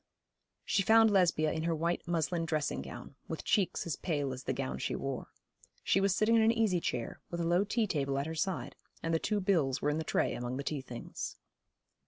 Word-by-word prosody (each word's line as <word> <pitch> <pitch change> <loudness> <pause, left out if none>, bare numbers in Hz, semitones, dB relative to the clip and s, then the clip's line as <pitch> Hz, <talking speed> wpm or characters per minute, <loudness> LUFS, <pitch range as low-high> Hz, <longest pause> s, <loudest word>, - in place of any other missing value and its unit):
She 195 - +2
found 220 +2 +6
Lesbia 170 -5 +3
in 160 - -2
her 165 -1 +1
white 170 +3 -1
muslin 170 0 0
dressing 150 - -1
gown, 65 -1 -9
with - - -5
cheeks 195 -4 +1
as 165 -5 -2
pale 145 -6 -1
as 130 +1 -8
the - - 0
gown 65 0 -3
she - - -2
wore. - - -4 0.6
She 195 - +3
was 195 -1 +3
sitting 220 +3 +3
in 225 - +5
an 220 +1 +5
easy 220 -6 +2
chair, 120 -7 -3
with 170 - -4
a 170 - 0
low 175 +3 +3
tea 220 +2 +1
table 140 -7 -1
at 140 - 0
her 160 - -4
side, 160 -6 -2 0.3
and 165 - 0
the 165 - +3
two 210 +4 0
bills 160 -9 +2
were 145 - +1
in 150 - -1
the - - -2
tray - - +1
among 120 +1 -3
the 140 - -3
tea 145 -1 -2
things. 125 -2 -6
165 Hz, 225 wpm, -32 LUFS, 140-195 Hz, 0.6 s, found